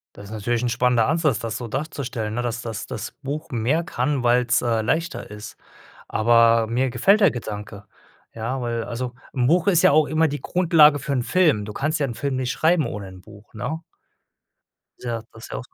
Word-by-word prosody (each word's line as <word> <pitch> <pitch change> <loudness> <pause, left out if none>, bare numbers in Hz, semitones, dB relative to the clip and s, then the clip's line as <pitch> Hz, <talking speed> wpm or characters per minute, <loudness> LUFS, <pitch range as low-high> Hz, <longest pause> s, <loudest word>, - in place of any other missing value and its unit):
Das 100 - -11
ist 100 - -12
natürlich 115 +2 -2
'n 120 - 0
spannender 120 -1 +2
Ansatz, 155 -6 +1
das 115 -1 -4
so 120 -2 -6
darzustellen, 125 -5 -4
ne, 120 - -1
dass 120 -1 -3
das 115 -1 -5
das - - -6
Buch 150 +3 -5
mehr 125 +7 0
kann, 130 0 -1
weil's, 120 0 +3
äh, 115 -2 +1
leichter 165 0 -2
ist. 105 +1 -9 0.5
Aber 115 0 +4
mir 125 +4 0
gefällt 195 - +3
der 195 -6 +6
Gedanke. 105 -3 -7 0.5
Ja, 115 +4 -3
weil 115 -2 -2
also 125 +1 -5 0.2
'n 125 -2 +1
Buch 170 +3 +3
ist 175 -5 +4
ja - - +6
auch 155 0 +4
immer 160 +1 +2
die 145 -1 -4
Grundlage 160 -4 +4
für 140 - -4
'n 130 - +1
Film. 155 - +2
du 105 - -7
kannst 150 +7 -1
ja 140 - +2
'n 120 - -5
Film 140 +2 -2
nicht 130 -1 -2
schreiben 160 -2 +2
ohne 100 -2 -6
'n 95 0 -12
Buch, 105 +2 -16
ne? 145 +9 -4 1.2
Ja, 115 -2 -3
das 110 - -11
ja. - - -5
125 Hz, 200 wpm, -23 LUFS, 115-150 Hz, 1.2 s, der